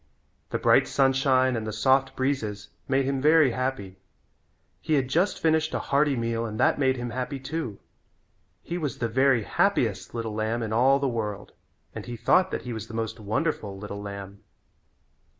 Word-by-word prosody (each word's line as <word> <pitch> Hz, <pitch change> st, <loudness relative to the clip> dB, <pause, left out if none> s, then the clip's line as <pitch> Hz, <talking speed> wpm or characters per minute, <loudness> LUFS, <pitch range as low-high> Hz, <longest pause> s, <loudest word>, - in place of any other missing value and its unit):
The -, -, -1 dB
bright -, -, +4 dB
sunshine 135 Hz, -1 st, +2 dB
and 110 Hz, -1 st, -3 dB
the -, -, -2 dB
soft 130 Hz, +5 st, +2 dB
breezes 115 Hz, -7 st, -2 dB, 0.2 s
made 135 Hz, 0 st, +1 dB
him 135 Hz, 0 st, -1 dB
very 155 Hz, -2 st, +5 dB
happy. 125 Hz, -7 st, -3 dB, 0.8 s
He 155 Hz, -, +1 dB
had 135 Hz, -3 st, +1 dB
just 175 Hz, +9 st, +1 dB
finished 160 Hz, -1 st, +1 dB
a -, -, 0 dB
hearty 140 Hz, 0 st, +3 dB
meal 115 Hz, -1 st, -1 dB
and 110 Hz, -2 st, -5 dB
that -, -, +3 dB
made 130 Hz, -2 st, +2 dB
him 120 Hz, -1 st, -4 dB
happy 130 Hz, +3 st, -4 dB
too. 135 Hz, -7 st, -4 dB, 0.9 s
He 175 Hz, +1 st, -4 dB
was 145 Hz, -6 st, -3 dB
the 115 Hz, -, -1 dB
very 130 Hz, 0 st, +3 dB
happiest -, -, 0 dB
little 115 Hz, -2 st, -3 dB
lamb 110 Hz, +2 st, -1 dB
in 110 Hz, -1 st, -3 dB
all 130 Hz, +4 st, +4 dB
the 140 Hz, 0 st, -1 dB
world 105 Hz, -4 st, -4 dB, 0.4 s
and -, -, -6 dB
he 120 Hz, -1 st, -6 dB
thought 175 Hz, +11 st, +3 dB
that -, -, -4 dB
he 125 Hz, -, -5 dB
was 110 Hz, -1 st, -6 dB
the 115 Hz, -, -9 dB
most 115 Hz, 0 st, -3 dB
wonderful 105 Hz, -1 st, -2 dB
little 100 Hz, 0 st, -7 dB
lamb. 100 Hz, -1 st, -8 dB
125 Hz, 180 wpm, -26 LUFS, 110-135 Hz, 0.9 s, very